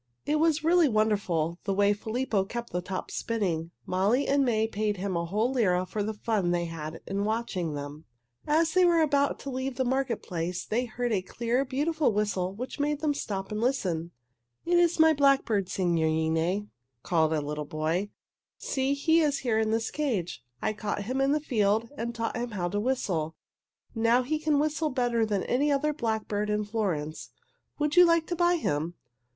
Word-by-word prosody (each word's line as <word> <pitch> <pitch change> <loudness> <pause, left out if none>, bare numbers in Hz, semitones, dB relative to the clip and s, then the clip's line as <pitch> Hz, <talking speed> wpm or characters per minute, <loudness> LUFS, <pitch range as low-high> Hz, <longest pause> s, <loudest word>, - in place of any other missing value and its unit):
It 300 +1 +1
was 320 -1 +2
really 335 -1 +4
wonderful, 195 -7 0
the 195 - 0
way 205 +1 +4
Filippo 220 0 -1
kept 235 +4 -6
the 180 - -1
tops 185 +1 -5
spinning. 180 -8 -1 0.2
Molly 200 +9 +1
and 280 0 +3
May 220 -4 +2
paid 210 -1 -1
him 190 0 -2
a 170 0 -1
whole 215 +7 0
lira 185 -8 +2
for 210 +3 -4
the 215 +1 -2
fun 205 -4 0
they 175 0 +1
had 160 -1 -6
in 200 +1 -2
watching 205 -7 -2
them. 145 +2 -7 0.4
As 320 +2 +2
they 370 - +5
were 340 -2 +4
about 285 -2 +2
to 275 - -5
leave 260 0 -3
the 260 +1 0
market 260 -2 -1
place 175 0 -3
they 240 +3 0
heard 245 +1 -3
a 200 -4 +1
clear, 235 +7 -1
beautiful 295 +2 +1
whistle 200 -3 0
which 250 +9 -7
made 295 0 0
them 305 -2 +1
stop 195 -8 -4
and 210 +1 -2
listen. 185 -10 0 0.6
"It 350 0 +3
is 345 -1 +2
my 320 0 +7
blackbird, 270 -9 +2
signorine," 165 +2 0 0.3
called 160 -3 +2
a 155 - +1
little 150 +1 -4
boy. 160 +7 -1 0.5
"See, 270 +1 -1
he 320 +3 +3
is 300 -3 +2
here 220 -3 +2
in 220 -1 +1
this 225 0 0
cage. 220 - -2 0.2
I - - +1
caught 205 -1 -3
him 255 +6 -1
in 270 +1 +3
the 300 - +2
field 225 -5 +1
and 235 -2 -4
taught 230 0 -2
him 240 +1 -3
how 180 -5 -2
to 205 - -1
whistle. 185 -10 -1 0.6
Now 230 +2 +3
he 305 +4 -1
can 305 -1 +1
whistle 305 +1 0
better 240 -4 +1
than 205 -3 0
any 285 +4 +1
other 300 +2 +1
blackbird 220 -5 -2
in 210 0 0
Florence. 180 -8 -3 0.5
Would 300 +1 0
you 360 - +9
like 335 -2 +4
to 350 - -3
buy 345 0 +3
him?" 165 - -1
220 Hz, 190 wpm, -28 LUFS, 185-275 Hz, 0.6 s, you